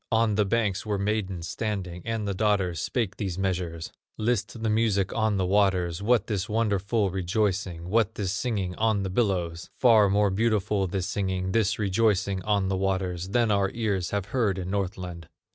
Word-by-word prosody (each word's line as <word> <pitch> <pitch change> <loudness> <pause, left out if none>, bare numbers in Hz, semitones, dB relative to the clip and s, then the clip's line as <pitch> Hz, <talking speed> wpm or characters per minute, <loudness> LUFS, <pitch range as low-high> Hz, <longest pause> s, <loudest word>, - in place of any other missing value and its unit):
On 115 -1 +3
the 105 0 +2
banks 105 -2 0
were 105 -2 -1
maidens 100 -4 -2
standing, 95 -5 -4
And 115 -2 -2
the 100 - -1
daughters 95 -5 +1
spake 110 -5 -2
these 95 -4 -3
measures: 90 -4 -2 0.3
"List 110 0 -1
the 110 - +1
music 105 -4 +1
on 110 -2 +1
the 95 - +1
waters! 95 -3 +2
What 110 0 +3
this 105 0 -2
wonderful 105 -1 +1
rejoicing, 95 -2 -1
What 110 +2 +1
this 95 -3 -2
singing 105 -5 -2
on 110 -2 +1
the 95 - -3
billows? 90 -6 -1
Far 110 -5 +5
more 100 0 +3
beautiful 105 -1 +1
this 90 0 -2
singing, 95 -1 -2
This 110 -2 +1
rejoicing 100 -1 +1
on 100 -2 +1
the 95 0 0
waters, 95 -2 -1
Than 115 +1 +2
our 100 -1 +2
ears 100 -6 -1
have 100 -2 -2
heard 110 -7 +1
in 90 0 -4
Northland." 90 -4 -4
100 Hz, 175 wpm, -26 LUFS, 95-110 Hz, 0.3 s, Far